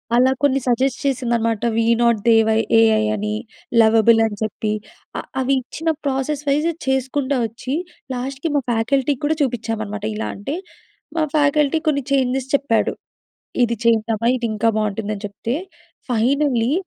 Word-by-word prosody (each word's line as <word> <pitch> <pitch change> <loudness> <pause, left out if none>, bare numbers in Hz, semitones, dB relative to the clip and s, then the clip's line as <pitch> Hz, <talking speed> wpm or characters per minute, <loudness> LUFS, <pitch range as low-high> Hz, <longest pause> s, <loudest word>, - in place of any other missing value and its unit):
అలా 255 +2 +5
కొన్ని 275 -1 +3
సజెస్ట్ 255 +1 +1
చేసిందనమాట. 235 -5 0
వి 225 0 +2 0.2
నాట్ 235 -1 +4
దే 230 - +7
వై 220 0 +3 0.2
ఏఐ 220 -1 +4
అని, 210 0 -2 0.5
లవబుల్ 225 +1 +5
అని 210 -2 -3
చెప్పి, 215 0 -2 0.5
ఆహ్, - - -8
అవి 265 +1 +1
ఇచ్చిన 320 +6 -4 0.2
ప్రాసెస్ 275 +2 -1
వైజ్ 295 +3 +2 0.2
చేసుకుంటా 265 +1 0
వచ్చి, 235 +4 -6 0.4
లాస్ట్‌కి 270 +5 -3
మా 285 - +3
ఫ్యాకల్టీకి 260 +4 0
కూడా 310 +1 +1
చూపించామనమాట. 220 -4 -3
ఇలా 220 - -3
అంటే, 240 +10 -4 0.6
మా 320 - +3
ఫ్యాకల్టీ 295 +1 +3
కొన్ని 280 -2 +1
చేంజెస్ 265 -1 0
చెప్పాడు. 265 -5 +1 0.7
ఇది 235 0 -1
చేద్దమా, 225 -1 +2
ఇది 235 -2 -2
ఇంకా 220 +2 +1
బాగుంటుందని 210 0 -3
చెప్తే 205 +4 -4 0.6
ఫైనల్లీ 250 +1 +2
245 Hz, 140 wpm, -20 LUFS, 225-275 Hz, 0.7 s, దే